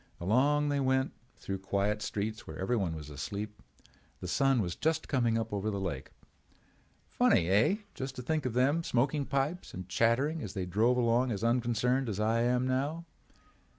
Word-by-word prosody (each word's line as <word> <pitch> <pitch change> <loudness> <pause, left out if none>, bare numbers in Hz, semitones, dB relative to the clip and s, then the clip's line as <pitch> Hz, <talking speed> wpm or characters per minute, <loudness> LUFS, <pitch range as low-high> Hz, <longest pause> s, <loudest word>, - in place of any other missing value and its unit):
Along 140 +10 +2
they 145 -1 +1
went 130 0 +1 0.3
through 95 -1 -4
quiet 100 +2 0
streets 105 +1 -3
where 80 - -7
everyone 95 -4 0
was 75 -1 -8
asleep. 100 +9 -5 0.6
The 90 - -6
sun 135 +6 +3
was 90 -5 -1
just 160 0 0
coming 120 -4 +1
up 115 -1 -3
over 100 +1 -1
the 100 -2 -2
lake. 95 -2 -4 1.0
Funny, 85 - +3
eh—just 135 - 0
to 125 - -6
think 155 0 0
of 120 - -3
them 140 +7 +2
smoking 140 +2 0
pipes 140 +6 -2
and 90 0 -7
chattering 130 - +1
as 105 - -6
they 95 -2 -2
drove 110 +7 +2
along 120 +1 +2
as 100 -1 -3
unconcerned 120 +2 +1
as 105 -1 -3
I 110 +2 +2
am 125 +1 +2
now. 145 +6 -1
120 Hz, 170 wpm, -31 LUFS, 100-135 Hz, 1.0 s, sun